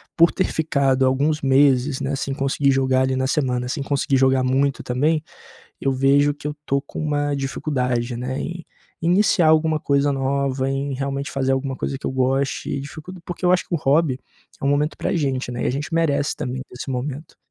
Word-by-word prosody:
por 170 +1 +5
ter 185 - 0
ficado 135 -4 +1
alguns 145 +4 +1
meses, 135 0 +3
né, 140 +1 -1
sem 135 0 -3
conseguir 140 0 +1
jogar 130 -1 +2
ali 130 0 +1
na 130 0 0
semana, 125 -3 0
sem 140 +2 -3
conseguir 140 -1 0
jogar 130 0 +3
muito 135 +2 +1
também 150 +6 +1 0.6
eu 135 - +1
vejo 140 +2 +3
que 145 0 -7
eu 150 - -4
tô 140 - +1
com 140 - -9
uma 145 -1 0
dificuldade, 125 -3 -2
né, 125 +2 -3
em 170 -1 -5 0.4
iniciar 175 0 +3
alguma 160 0 +3
coisa 140 0 +2
nova, 135 0 0
em 135 0 -2
realmente 140 +1 -3
fazer 135 -1 0
alguma 135 0 -1
coisa 135 - -3
que - - -8
eu - - -2
goste 130 +1 0
e 140 - -2
dificuld 155 +6 -9
porque 175 +1 -7
eu 180 - +5
acho 180 - +2
que - - -5
o - - 0
hobby 140 -2 +2 0.4
é - - -9
um - - +3
momento 145 +2 +1
pra - - -2
a - - 0
gente, 135 -4 -1
né, 120 0 -4
e - - +1
a - - +2
gente 150 +5 -4
merece 150 -3 +1
também 130 +1 -4
desse 125 +2 -7
momento. 135 +4 -5
140 Hz, 210 wpm, -22 LUFS, 130-150 Hz, 0.6 s, por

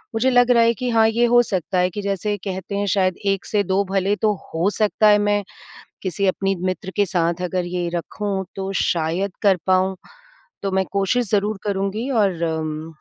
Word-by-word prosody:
मुझे 240 +4 +2
लग 245 -1 +4
रहा 235 -1 +5
है 230 0 +4
कि 250 +3 -3
हाँ 225 -1 +4
ये 230 +2 +2
हो 240 0 +5
सकता 185 -4 -2
है 180 0 +2
कि 205 +3 -5
जैसे 200 +1 -1
कहते 190 0 -5
हैं 205 - 0
शायद 185 -2 +1
1 195 -1 0
से 210 -1 0
2 190 +1 +1
भले 195 +1 +1
तो 210 +1 +1 0.2
हो 165 +4 +1
सकता 215 0 +3
है 210 0 +6
मैं, 205 0 +1 0.6
किसी 190 +1 -1
अपनी 195 +1 +1
मित्र 185 +1 -3
के 205 -1 +3
साथ 170 -1 0
अगर 180 0 -1
ये 175 0 -3
रखूँ 195 +3 -3
तो 195 0 -3
शायद 175 +4 0
कर 200 -3 +5
पाऊँ। 185 0 +2 0.7
तो 195 - -1
मैं 190 0 +2
कोशिश 200 +4 +1
ज़रूर 210 0 +1
करूँगी 200 +4 -2
और 200 -9 +1
अम, 160 -1 -3
195 Hz, 200 wpm, -21 LUFS, 185-210 Hz, 0.7 s, है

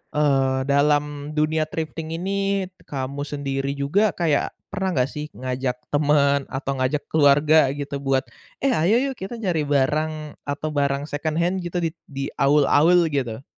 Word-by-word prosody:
eee, 135 -3 +2
dalam 145 +1 +1
dunia 155 +1 +1
thrifting 160 0 -4
ini 195 +2 -1 0.2
kamu 140 +1 -4
sendiri 140 -1 -3
juga 180 +9 +1
kayak 160 -5 0 0.2
pernah 190 -3 -2
enggak 130 +1 +2
sih 150 0 -5
ngajak 130 0 -2 0.2
temen 145 -1 +3
atau 135 +1 -3
ngajak 135 +3 0
keluarga 150 0 +5
gitu 140 -1 -4
buat, 135 -1 +1 0.4
eh 275 - +3
ayo 215 +6 +3
yuk 260 - -11
kita 195 +5 -5
nyari 175 -9 -1
barang 150 +2 0
atau 150 +2 -3
barang 140 -1 0
second 155 +2 -2
hand 175 +3 +1
gitu 175 0 -3
di 165 - 0 0.2
di 140 -1 -5
awul-awul 150 +4 +4
gitu? 130 -3 -2
145 Hz, 150 wpm, -23 LUFS, 140-160 Hz, 0.4 s, keluarga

